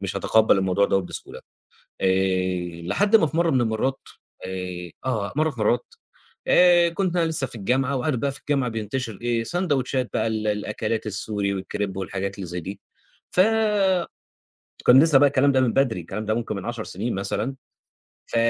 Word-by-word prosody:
مش 100 -1 -3
هاتقبّل 110 -3 +3
الموضوع 95 +1 +2
دوّة 95 - +2
بسهولة. 90 - -8 0.6
آآ، 95 -2 0
لحد 200 - +2
ما 210 - +5
في 160 - -4
مرّه 170 0 +3
من 130 - +2
المرات، 120 +4 -1 0.5
آآ 90 -2 -6
آه، 110 -6 -2
مرّه 155 +2 +2
في 130 -6 -9
مرات، 120 +3 +1 0.6
آآ 175 -1 +5
كُنت 180 +1 -2
أنا 170 - +3
لسه 155 -4 0
في 120 - -8
الجامعة، 130 +6 0
وعارف 135 +2 0
بقى 140 +3 0
في 135 - -5
الجامعة 140 -4 -1
بينتشر 115 0 -4
إيه، 120 -1 0
ساندويتشات 135 -4 -1
بقى - - 0
ال 110 -1 -2
الأكلات 105 +2 -2
السوري 100 -1 -2
والكريب 95 0 -4
والحاجات 95 +1 -4
اللي 100 - -6
زي 90 +1 -4
دي، 95 +4 -7 0.5
ف 180 - +4 1.5
كان 130 +3 +8
لسه 160 -4 +5
بقى 145 +1 +6
الكلام 140 0 +3
ده 130 - +3
من 125 -3 +2
بدري، 130 -8 +1
الكلام 95 +6 -6
ده 110 0 0
ممكن 115 -2 -3
من 100 - -6
10 120 -2 -4
سنين 110 +6 -4
مثلًا، 100 +6 -2 0.7
ف - - -5
115 Hz, 180 wpm, -24 LUFS, 95-135 Hz, 1.5 s, كان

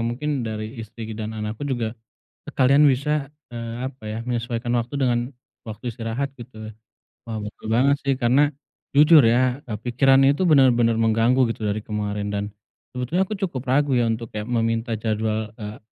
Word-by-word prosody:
mungkin 120 +6 -2
dari 110 +1 -5
istri 110 0 -8
dan 110 0 -5
anakku 110 +6 -4
juga 115 -4 -2 0.5
sekalian 140 +3 +3
bisa, 145 +1 +1 0.2
eee, 115 -1 -6
apa 130 -3 -12
ya, 110 +1 -4
menyesuaikan 120 0 -2
waktu 120 +4 -2
dengan 120 -3 +2 0.4
waktu 110 +2 -7
istirahat, 120 +4 -4
gitu. 110 -3 -10 0.5
Wah, 110 - -3
betul 105 0 -8
banget 135 +5 +4
sih, 135 -2 0
karena 135 +4 +3 0.5
jujur 150 0 +8
ya, 125 +3 +2
eee, 105 - -3
pikirannya 135 +4 +4
itu 165 - -4
bener-bener 120 -5 +4
mengganggu 115 +3 +3
gitu 105 -2 -3
dari 105 +1 -3
kemarin 105 -1 -3
dan, 100 0 -1 0.5
sebetulnya 175 - 0
aku 215 - -3
cukup 170 - -3
ragu 140 +1 +2
ya 120 -2 +2
untuk 115 0 -4
ya 105 - -3
meminta 115 0 -1
jadwal, 110 0 -2
eee, 105 -1 -8
120 Hz, 160 wpm, -23 LUFS, 110-135 Hz, 0.5 s, jujur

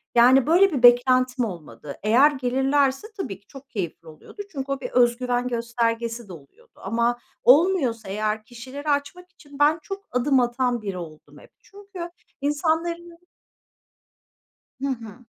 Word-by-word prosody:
Yani, 255 +3 +6
böyle 360 +2 +4
bir 250 -3 -2
beklentim 255 +1 +5
olmadı. 150 - -9
Eğer 250 +8 +5
gelirlerse 270 +4 0
tabii 200 - -5
ki 200 - -37
çok 270 0 -14
keyifli 170 -5 -5
oluyordu. 160 - -11
Çünkü 275 -2 -5
o 275 - -2
bir 250 - -4
öz 240 -1 +3
güven 250 -1 -1
göstergesi 235 -1 -2
de 180 - -8
oluyordu 140 -4 -17
ama 235 +4 -1 0.2
olmuyorsa 265 - +3
eğer 215 +2 -2
kişileri 260 +6 -8
açmak 295 +6 -2
için 290 -5 -16
ben 300 +3 +4
çok 395 0 -7
adım 260 +2 +2
atan 245 -1 0
biri 195 -3 -5
oldum 160 -3 -11
hep - - -18
çünkü 395 -4 -10 0.3
insanlarının 335 +3 -1 1.6
Hı 275 - -1
hı. 235 -2 -6
250 Hz, 145 wpm, -24 LUFS, 230-290 Hz, 1.6 s, Yani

